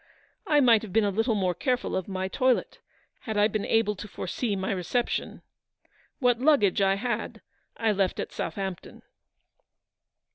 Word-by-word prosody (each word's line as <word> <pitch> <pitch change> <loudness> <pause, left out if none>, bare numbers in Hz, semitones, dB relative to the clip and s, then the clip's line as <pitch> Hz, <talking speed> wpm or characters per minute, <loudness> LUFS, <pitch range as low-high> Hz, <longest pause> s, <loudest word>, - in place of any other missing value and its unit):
I 300 -4 +4
might 235 -5 +5
have 215 - -8
been 225 +3 +3
a 205 - +1
little 225 +3 +1
more 185 -3 +1
careful 250 +4 -1
of 190 - -2
my 190 -1 -3
toilet, 255 +6 0 0.4
had 220 -2 -5
I 205 0 +5
been 215 -1 -3
able 225 -2 +2
to 210 - -7
foresee 205 +3 -3
my 190 0 -2
reception. 195 +6 -2 0.7
What 245 -3 +2
luggage 255 - +3
I 195 0 +3
had 235 +1 -3 0.4
I 225 -1 +1
left 195 -2 0
at - - -4
Southampton 190 -3 -5
210 Hz, 155 wpm, -27 LUFS, 195-240 Hz, 0.7 s, might